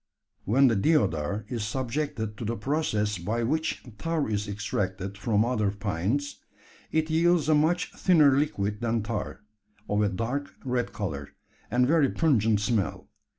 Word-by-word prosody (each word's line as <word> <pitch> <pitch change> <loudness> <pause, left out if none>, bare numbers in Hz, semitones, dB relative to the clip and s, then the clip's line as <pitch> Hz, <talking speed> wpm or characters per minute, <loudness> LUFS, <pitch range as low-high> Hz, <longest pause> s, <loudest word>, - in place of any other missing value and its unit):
When 130 +7 +4
the 115 - +3
deodar 100 - +1
is 115 -2 -3
subjected 120 -1 -3
to - - -4
the 115 +2 -2
process 105 - -1
by 110 +7 -1
which 155 +7 -1 0.2
tar 165 -2 -1
is 105 -1 -2
extracted 100 -1 -3
from 105 +1 +1
other 110 -4 +1
pines, 100 - -2 0.5
it 160 0 0
yields 170 -1 +3
a 155 - +4
much 160 +4 +2
thinner 155 -6 +5
liquid 105 -7 -1
than 115 -2 0
tar 105 -1 -4 0.5
of 105 +1 +1
a 105 - +2
dark 125 +8 -3
red 125 -1 -1
colour, 75 -10 -5 0.3
and 125 +3 +3
very 145 -1 +3
pungent 115 -10 +2
smell. 105 -1 -1
115 Hz, 150 wpm, -27 LUFS, 105-145 Hz, 0.5 s, thinner